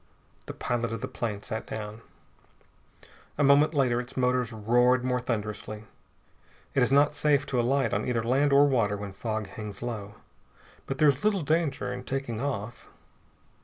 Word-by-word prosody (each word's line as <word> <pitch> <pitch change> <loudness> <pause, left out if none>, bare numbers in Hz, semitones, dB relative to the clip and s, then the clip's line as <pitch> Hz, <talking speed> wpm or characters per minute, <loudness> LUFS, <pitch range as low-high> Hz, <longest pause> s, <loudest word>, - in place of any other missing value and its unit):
The - - -6
pilot 120 -1 -2
of 115 - -4
the - - -3
plane 105 -4 -4
sat 110 0 -5
down. 110 0 -6 1.4
A 145 - +2
moment 145 +3 +5
later 125 -3 +2
its 125 +2 -11
motors 125 -1 +1
roared 120 +3 +3
more 125 0 +1
thunderously. 105 -2 -4 0.9
It 135 - +2
is 125 - +3
not 145 +2 +4
safe 145 -1 +2
to 125 - -1
alight 135 +3 +1
on - - -1
either 120 -2 0
land 135 +5 +2
or 140 +1 +7
water 115 -7 +1
when 100 -1 -7
fog 110 +1 -3
hangs 105 +3 -8
low, 105 -4 -5 0.7
but 135 - -3
there 155 0 +5
is 140 -1 +2
little 205 -5 +2
danger 155 -5 0
in 125 0 -6
taking 130 -4 -3
off. 120 -5 -4
125 Hz, 165 wpm, -28 LUFS, 110-140 Hz, 1.4 s, or